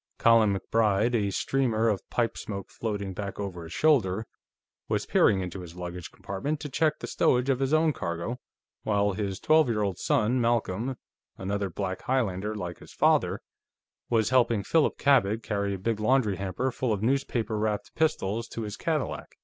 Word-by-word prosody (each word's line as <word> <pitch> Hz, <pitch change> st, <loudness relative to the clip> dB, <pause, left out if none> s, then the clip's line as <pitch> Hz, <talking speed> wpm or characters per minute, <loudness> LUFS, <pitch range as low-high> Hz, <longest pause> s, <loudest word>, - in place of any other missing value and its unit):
Colin 115 Hz, -3 st, +5 dB
MacBride, 110 Hz, +3 st, +1 dB
a 105 Hz, -4 st, +1 dB
streamer 115 Hz, 0 st, +1 dB
of 105 Hz, -4 st, +1 dB
pipe 120 Hz, -2 st, 0 dB
smoke 100 Hz, -2 st, -6 dB
floating 100 Hz, -4 st, -3 dB
back 100 Hz, +1 st, -5 dB
over 95 Hz, -4 st, -4 dB
his 80 Hz, -, -9 dB
shoulder, 110 Hz, -, +2 dB, 0.6 s
was -, -, 0 dB
peering 100 Hz, -3 st, +3 dB
into 90 Hz, +1 st, -5 dB
his 85 Hz, -2 st, -10 dB
luggage 90 Hz, -1 st, -6 dB
compartment 140 Hz, +11 st, -4 dB
to 150 Hz, -, -6 dB
check 155 Hz, +3 st, +1 dB
the -, -, -6 dB
stowage 125 Hz, +2 st, +2 dB
of 130 Hz, -, 0 dB
his 135 Hz, 0 st, 0 dB
own 155 Hz, 0 st, +3 dB
cargo, 85 Hz, +6 st, -4 dB, 0.4 s
while 100 Hz, -1 st, +1 dB
his 100 Hz, -1 st, -3 dB
twelve 155 Hz, -4 st, +4 dB
year 105 Hz, -2 st, +1 dB
old 100 Hz, -3 st, -2 dB
son, 120 Hz, +4 st, +2 dB
Malcolm, 115 Hz, +1 st, 0 dB, 0.4 s
another 100 Hz, +1 st, -2 dB
black 95 Hz, +2 st, -4 dB
Highlander 110 Hz, -5 st, -1 dB
like 90 Hz, -4 st, -5 dB
his -, -, -14 dB
father, -, -, +2 dB, 0.7 s
was 110 Hz, -1 st, +2 dB
helping 120 Hz, -5 st, +3 dB
Philip 160 Hz, +6 st, +2 dB
Cabot 115 Hz, -6 st, +3 dB
carry 100 Hz, -1 st, -1 dB
a -, -, -5 dB
big 110 Hz, +3 st, -2 dB
laundry 110 Hz, -3 st, +2 dB
hamper 100 Hz, +7 st, -2 dB
full 125 Hz, -1 st, -1 dB
of 105 Hz, -1 st, -1 dB
newspaper 120 Hz, -3 st, 0 dB
wrapped 105 Hz, -1 st, -2 dB
pistols 115 Hz, -8 st, 0 dB
to 115 Hz, -, -5 dB
his 105 Hz, -1 st, -5 dB
Cadillac. -, -, -3 dB
110 Hz, 175 wpm, -27 LUFS, 100-125 Hz, 0.7 s, Colin